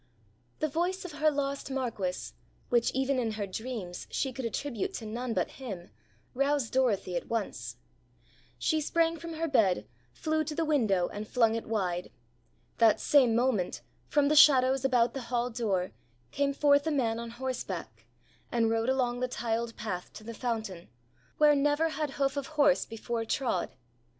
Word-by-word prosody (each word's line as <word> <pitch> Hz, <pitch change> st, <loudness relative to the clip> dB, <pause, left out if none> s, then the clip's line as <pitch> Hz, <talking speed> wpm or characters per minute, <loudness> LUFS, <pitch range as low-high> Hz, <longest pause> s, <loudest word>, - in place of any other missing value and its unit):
The 310 Hz, -, +2 dB
voice 355 Hz, +5 st, -1 dB
of 360 Hz, -, -6 dB
her 305 Hz, +1 st, +2 dB
lost 280 Hz, -1 st, -2 dB
Marquis, 230 Hz, -9 st, -3 dB, 0.4 s
which 240 Hz, -1 st, +3 dB
even 265 Hz, 0 st, 0 dB
in 225 Hz, -3 st, -1 dB
her 210 Hz, -1 st, -3 dB
dreams 200 Hz, -3 st, -6 dB
she 265 Hz, -2 st, -1 dB
could 260 Hz, 0 st, -5 dB
attribute 230 Hz, -1 st, -3 dB
to 225 Hz, -, -5 dB
none 235 Hz, +2 st, -3 dB
but -, -, 0 dB
him, 195 Hz, -8 st, -7 dB, 0.4 s
roused 275 Hz, -2 st, 0 dB
Dorothy 215 Hz, -8 st, +1 dB
at 170 Hz, -, -3 dB
once. 115 Hz, -, -3 dB, 0.8 s
She 310 Hz, -, +1 dB
sprang 330 Hz, +2 st, +1 dB
from 335 Hz, 0 st, -6 dB
her 325 Hz, +1 st, -2 dB
bed, 195 Hz, -, +2 dB, 0.3 s
flew 315 Hz, -, -1 dB
to 300 Hz, -, -4 dB
the 330 Hz, -, 0 dB
window, 220 Hz, -, +2 dB
and 210 Hz, +1 st, -6 dB
flung 230 Hz, -2 st, +3 dB
it 230 Hz, -, -4 dB
wide. 180 Hz, -5 st, -1 dB, 0.7 s
That 225 Hz, -2 st, +5 dB
same 255 Hz, -6 st, +4 dB
moment, 235 Hz, -7 st, +1 dB, 0.3 s
from 290 Hz, -1 st, +3 dB
the 305 Hz, -, +3 dB
shadows 265 Hz, -3 st, +6 dB
about 245 Hz, -3 st, +3 dB
the 270 Hz, -, -4 dB
hall 245 Hz, 0 st, 0 dB
door, 200 Hz, -6 st, -1 dB, 0.4 s
came 280 Hz, 0 st, 0 dB
forth 285 Hz, +1 st, +4 dB
a -, -, +2 dB
man 230 Hz, -6 st, 0 dB
on 235 Hz, 0 st, -5 dB
horseback, 200 Hz, -, -5 dB, 0.4 s
and 230 Hz, -2 st, +2 dB
rode 225 Hz, +2 st, +1 dB
along 250 Hz, -2 st, +1 dB
the 255 Hz, -, 0 dB
tiled 230 Hz, -1 st, -2 dB
path 190 Hz, -5 st, -5 dB
to 215 Hz, -, -10 dB
the 230 Hz, +1 st, -7 dB
fountain, 220 Hz, -7 st, -4 dB, 0.5 s
where 300 Hz, -1 st, +6 dB
never 295 Hz, +3 st, +2 dB
had 300 Hz, -2 st, -3 dB
hoof 275 Hz, 0 st, +1 dB
of 280 Hz, -, -2 dB
horse 285 Hz, -2 st, +4 dB
before 225 Hz, +1 st, -3 dB
trod. 225 Hz, -5 st, -1 dB
245 Hz, 170 wpm, -30 LUFS, 220-280 Hz, 0.8 s, shadows